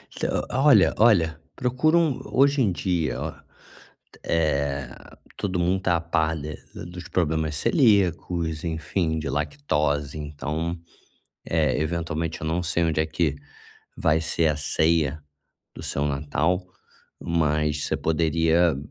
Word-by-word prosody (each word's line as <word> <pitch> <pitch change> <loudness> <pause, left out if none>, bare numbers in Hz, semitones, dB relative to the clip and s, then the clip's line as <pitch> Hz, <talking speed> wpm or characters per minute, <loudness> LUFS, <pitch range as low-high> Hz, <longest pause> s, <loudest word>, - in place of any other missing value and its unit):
Então - - -1
olha 130 -7 +5
olha, 85 -9 +4 0.2
procura 130 +6 +2
um 160 -6 +2
hoje 140 +1 +3
em 100 -6 +3
dia, 85 -3 -1
ó, - - -4 0.9
eh, 70 -5 0 0.5
todo 95 -3 -2
mundo 90 +2 +2
está 95 -2 +1
a - - -4
par 80 -1 0
de 75 +2 -6 0.2
ah, - - -7
dos 90 0 -9
problemas 80 -3 0
celíacos, 90 - +2
enfim, 80 0 -1
de 80 - -4
lactose. 75 - -1
Então, 75 +3 -4 0.7
eh, 80 -3 +1
eventualmente 80 0 -2
eu 80 - -3
não 85 +2 0
sei 85 -1 0
onde 80 -1 +1
é 80 - 0
que 80 -2 0 0.6
vai 80 +1 +2
ser 80 0 +1
a 75 - 0
ceia 80 0 +1 0.5
do - - -9
seu 70 - -2
Natal, 75 +5 0 0.6
mas 75 -2 0
você - - 0
poderia, 80 0 +2
80 Hz, 135 wpm, -25 LUFS, 75-90 Hz, 0.9 s, olha